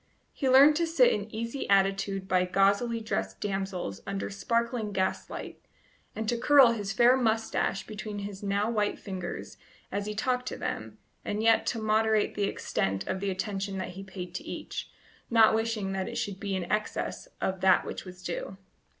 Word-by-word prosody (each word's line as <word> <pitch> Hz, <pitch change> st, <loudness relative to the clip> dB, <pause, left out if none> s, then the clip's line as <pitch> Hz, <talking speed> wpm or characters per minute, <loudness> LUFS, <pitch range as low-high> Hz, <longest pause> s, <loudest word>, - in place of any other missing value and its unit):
He 270 Hz, -, 0 dB
learned 280 Hz, +4 st, +8 dB
to 335 Hz, 0 st, +1 dB
sit 480 Hz, +10 st, +5 dB
in 210 Hz, +1 st, -3 dB
easy 230 Hz, +5 st, -4 dB
attitude 195 Hz, 0 st, +2 dB
by 185 Hz, -1 st, +3 dB
gauzily 200 Hz, +5 st, +2 dB
dressed 95 Hz, -, -2 dB
damsels 190 Hz, -, -3 dB
under 195 Hz, 0 st, -3 dB
sparkling 230 Hz, +1 st, -1 dB
gaslight, 190 Hz, 0 st, -3 dB, 0.5 s
and 220 Hz, 0 st, -3 dB
to 235 Hz, +1 st, 0 dB
curl 275 Hz, -2 st, +7 dB
his 205 Hz, -4 st, -3 dB
fair 240 Hz, +5 st, +5 dB
moustache 225 Hz, -5 st, 0 dB
between 210 Hz, -1 st, -6 dB
his 200 Hz, -1 st, -7 dB
now 200 Hz, +1 st, 0 dB
white 215 Hz, -3 st, 0 dB
fingers 185 Hz, -3 st, -6 dB, 0.3 s
as 200 Hz, +1 st, -2 dB
he 210 Hz, -, -4 dB
talked 250 Hz, +3 st, 0 dB
to -, -, -4 dB
them, -, -, -4 dB, 0.3 s
and 210 Hz, +1 st, -2 dB
yet 225 Hz, 0 st, +4 dB
to 230 Hz, -, 0 dB
moderate 215 Hz, 0 st, +2 dB
the 205 Hz, -, 0 dB
extent 95 Hz, -, -1 dB
of 190 Hz, -, -2 dB
the 200 Hz, +1 st, -1 dB
attention 195 Hz, +1 st, -3 dB
that 185 Hz, -, -3 dB
he 190 Hz, +2 st, -8 dB
paid 185 Hz, -2 st, -8 dB
to -, -, -5 dB
each, -, -, -6 dB, 0.4 s
not 225 Hz, -2 st, +6 dB
wishing 220 Hz, -3 st, -1 dB
that 190 Hz, -1 st, -2 dB
it -, -, -7 dB
should 195 Hz, -2 st, -3 dB
be 200 Hz, -2 st, -2 dB
in 185 Hz, -, -1 dB
excess 215 Hz, -, -2 dB
of 190 Hz, 0 st, -2 dB
that 190 Hz, -1 st, +5 dB
which -, -, -5 dB
was 185 Hz, -1 st, -11 dB
due. 185 Hz, +2 st, -4 dB
205 Hz, 180 wpm, -29 LUFS, 190-225 Hz, 0.5 s, learned